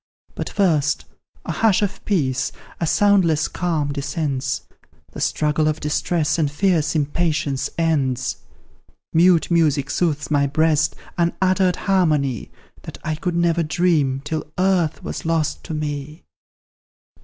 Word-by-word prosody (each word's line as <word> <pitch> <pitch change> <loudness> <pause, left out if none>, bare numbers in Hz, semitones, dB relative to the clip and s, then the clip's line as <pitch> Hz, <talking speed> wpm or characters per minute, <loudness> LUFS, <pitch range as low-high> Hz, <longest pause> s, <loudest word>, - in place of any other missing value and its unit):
"But, - - -4
first, 155 -7 +1 0.4
a - - -3
hush 215 -2 +2
of 195 -1 -3
peace 135 -10 0 0.3
a 165 - 0
soundless 180 -5 +3
calm 160 -5 -1
descends; 140 -2 -2 0.5
The - - -8
struggle 155 0 +1
of 155 0 0
distress, 155 +2 0
and 150 -3 +2
fierce 165 -1 +1
impatience 150 -2 0
ends; 140 -7 0 0.8
Mute 175 0 +4
music 150 -5 +2
soothes 155 -3 -1
my 140 -1 +3
breast 155 +1 +2 0.2
unuttered 185 +1 +2
harmony, 155 - +1 0.3
That - - -9
I 155 - -1
could 170 +3 -3
never 170 0 +2
dream, 155 -5 +1
till 155 0 -4
Earth 180 -4 +1
was - - -5
lost 160 -2 -1
to 160 - -4
me. 150 +1 -5
155 Hz, 125 wpm, -21 LUFS, 145-175 Hz, 0.8 s, Mute